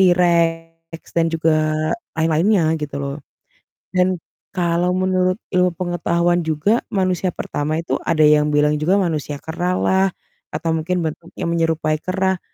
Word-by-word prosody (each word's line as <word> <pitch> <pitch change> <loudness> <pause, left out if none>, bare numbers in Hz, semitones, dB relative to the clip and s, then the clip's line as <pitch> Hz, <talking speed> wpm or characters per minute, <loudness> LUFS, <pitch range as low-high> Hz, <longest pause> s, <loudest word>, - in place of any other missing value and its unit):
rex 165 -1 0
dan 165 - +3
juga 155 -1 +2 0.4
lain-lainnya 160 +1 +2
gitu 150 -1 -5
loh. 140 +1 -4 0.8
Dan 185 0 +2 0.4
kalau 175 0 +1
menurut 185 0 +1 0.2
ilmu 180 0 +4
pengetahuan 175 -1 +1
juga, 160 +9 +2
manusia 185 -2 0
pertama 150 +2 -2
itu 165 - -2
ada 155 -1 +2
yang 150 0 +5
bilang 150 0 +3
juga 175 +6 +3
manusia 155 -6 -1
kera 175 +3 -2
lah 190 +1 +2 0.5
atau 165 - -1
mungkin 170 +2 -1
bentuknya 160 +2 -6
menyerupai 160 -2 0
kera. 190 0 0
170 Hz, 130 wpm, -20 LUFS, 155-180 Hz, 0.8 s, yang